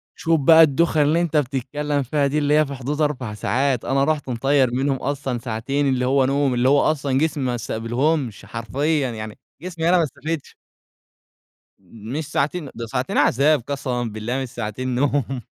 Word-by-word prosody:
شوف 165 Hz, -1 st, +1 dB
بقى 160 Hz, +4 st, +7 dB
الدوخة 155 Hz, +1 st, +2 dB
اللي 155 Hz, +4 st, +3 dB
أنت 160 Hz, -3 st, 0 dB
بتتكلم 145 Hz, +2 st, -1 dB
فيها 140 Hz, +2 st, 0 dB
دي، 145 Hz, -, -1 dB
اللي 150 Hz, 0 st, +1 dB
هي 155 Hz, 0 st, +4 dB
في 140 Hz, -, -7 dB
حدود 140 Hz, +4 st, -3 dB
4 130 Hz, -7 st, -1 dB
ساعات، 130 Hz, +3 st, 0 dB
أنا 135 Hz, +1 st, +1 dB
رحت 150 Hz, -2 st, -1 dB
مطَيَّر 130 Hz, +1 st, +2 dB
منهم 135 Hz, +2 st, +1 dB
أصلًا 135 Hz, -2 st, -3 dB
ساعتين 130 Hz, +5 st, -2 dB
اللي 125 Hz, -1 st, 0 dB
هو 135 Hz, +1 st, +3 dB
نوم 140 Hz, -1 st, +1 dB
اللي 125 Hz, +2 st, +2 dB
هو 145 Hz, +1 st, +4 dB
أصلًا 140 Hz, -3 st, 0 dB
جسمي 155 Hz, -1 st, 0 dB
ما 125 Hz, -1 st, -1 dB
استقبلهمش، 120 Hz, +3 st, -2 dB
حرفيًا. 135 Hz, +4 st, -1 dB
يعني 110 Hz, -1 st, -7 dB, 0.2 s
جسمي 170 Hz, -2 st, -2 dB
أنا 180 Hz, -, +5 dB
ما 170 Hz, -, +3 dB
استفدش. 160 Hz, +1 st, -5 dB, 1.2 s
مش 115 Hz, -, -7 dB
ساعتين 150 Hz, +1 st, -1 dB
دول 115 Hz, -1 st, -6 dB
ساعتين 130 Hz, +1 st, -2 dB
عذاب 145 Hz, +3 st, +3 dB
قسمًا 135 Hz, -3 st, -2 dB
بالله 115 Hz, +3 st, -3 dB
مش 130 Hz, -, -5 dB
ساعتين 120 Hz, +3 st, -4 dB
نوم. 135 Hz, -1 st, 0 dB
135 Hz, 175 wpm, -22 LUFS, 125-150 Hz, 1.2 s, بقى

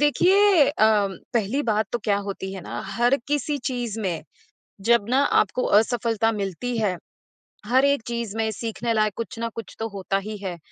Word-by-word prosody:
देखिए 360 Hz, +3 st, +5 dB
अ, 215 Hz, -6 st, +3 dB, 0.3 s
पहली 235 Hz, +6 st, +1 dB
बात 215 Hz, -3 st, +1 dB
तो 240 Hz, -, 0 dB
क्या 205 Hz, -2 st, +2 dB
होती 190 Hz, -1 st, -5 dB
है 190 Hz, -, -6 dB
ना -, -, -5 dB
हर 240 Hz, +7 st, +2 dB
किसी 290 Hz, 0 st, 0 dB
चीज़ 240 Hz, -4 st, -3 dB
में 180 Hz, -6 st, -2 dB, 0.7 s
जब 235 Hz, -3 st, +5 dB
ना 260 Hz, +2 st, +3 dB, 0.2 s
आपको 230 Hz, +5 st, -2 dB, 0.2 s
असफलता 225 Hz, -1 st, 0 dB
मिलती 210 Hz, +4 st, -3 dB
है। 205 Hz, -5 st, 0 dB, 0.7 s
हर 255 Hz, +5 st, +3 dB
एक 280 Hz, -2 st, +2 dB
चीज़ 235 Hz, -3 st, -3 dB
में 220 Hz, 0 st, +1 dB
सीखने 230 Hz, +2 st, -3 dB
लायक 215 Hz, -2 st, +1 dB
कुछ 230 Hz, +1 st, -5 dB
न 230 Hz, -, -1 dB
कुछ 230 Hz, -, -8 dB
तो 225 Hz, -, -2 dB
होता 195 Hz, -1 st, -2 dB
ही 215 Hz, +1 st, -5 dB
है। 190 Hz, -3 st, -5 dB
225 Hz, 180 wpm, -24 LUFS, 205-245 Hz, 0.7 s, देखिए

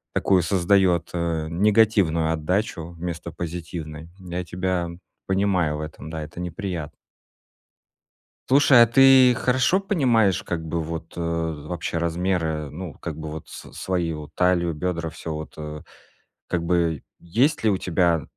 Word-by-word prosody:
такую 95 Hz, -2 st, +3 dB
создаёт, 90 Hz, 0 st, +2 dB
э, 85 Hz, -2 st, -1 dB
негативную 100 Hz, -4 st, +3 dB
отдачу 85 Hz, +1 st, -2 dB
вместо 85 Hz, -1 st, -5 dB
позитивной. 80 Hz, -1 st, -6 dB
Я 90 Hz, -1 st, -5 dB
тебя 90 Hz, 0 st, -2 dB, 0.4 s
понимаю 95 Hz, -6 st, +1 dB
в -, -, -5 dB
этом, 75 Hz, 0 st, -8 dB
да, 80 Hz, -1 st, -5 dB
это 80 Hz, +3 st, -10 dB
неприятно. 90 Hz, -2 st, -5 dB, 1.5 s
Слушай, 130 Hz, -2 st, +7 dB
а -, -, +6 dB
ты 130 Hz, +1 st, +7 dB
хорошо 130 Hz, +10 st, +2 dB
понимаешь 125 Hz, -, +2 dB
как 85 Hz, -2 st, -4 dB
бы 85 Hz, +1 st, -2 dB
вот 80 Hz, +1 st, -6 dB
вообще 85 Hz, 0 st, -3 dB
размеры, 85 Hz, -3 st, -1 dB
ну, 85 Hz, 0 st, -7 dB
как 80 Hz, -3 st, -6 dB
бы 80 Hz, -1 st, -6 dB
вот 80 Hz, 0 st, -8 dB
с -, -, -11 dB
свои, 90 Hz, -3 st, -2 dB
вот 75 Hz, -1 st, -8 dB
талию, 85 Hz, -2 st, +2 dB
бедра, 85 Hz, 0 st, -2 dB
всё 80 Hz, -1 st, -6 dB
вот, 80 Hz, 0 st, -7 dB
э? 75 Hz, 0 st, -7 dB, 0.7 s
Как 85 Hz, -1 st, -1 dB
бы 85 Hz, -3 st, +1 dB, 0.2 s
есть 120 Hz, -, +1 dB
ли 110 Hz, -, +5 dB
у 95 Hz, -, +1 dB
тебя 85 Hz, -3 st, +1 dB
85 Hz, 140 wpm, -24 LUFS, 80-95 Hz, 1.5 s, Слушай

